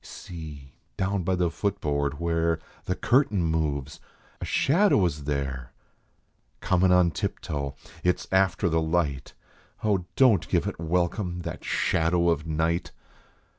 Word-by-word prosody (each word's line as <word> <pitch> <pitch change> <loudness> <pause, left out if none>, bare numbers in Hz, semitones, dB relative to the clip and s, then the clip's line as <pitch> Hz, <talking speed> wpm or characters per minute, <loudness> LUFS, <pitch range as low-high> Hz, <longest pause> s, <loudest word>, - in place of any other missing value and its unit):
See, 75 -6 -9 0.2
down 100 +1 0
by 95 +2 0
the 90 -2 +1
foot 100 +1 -2
board, 70 -1 -1
where 85 -1 +1 0.3
The 90 - -1
curtain 120 -8 +2
moves! 75 -3 -1 0.4
A - - -2
shadow 165 - +3
is 75 -4 -3
there, 70 -4 -3 0.9
Comin 90 0 +2
on 90 -2 +5
tiptoe! 70 -3 -3 0.3
It 90 0 +3
s - - -10
after 95 -1 +2
the 80 -1 +2
light. 80 -5 -1 0.5
Oh, 100 -5 +1
don 125 -7 +6
t - - -13
give - - +1
it - - -4
welcome, 90 +2 -1
that - - -6
shadow 85 +1 +1
of 80 -1 0
night 80 +2 0
85 Hz, 140 wpm, -26 LUFS, 75-90 Hz, 0.9 s, don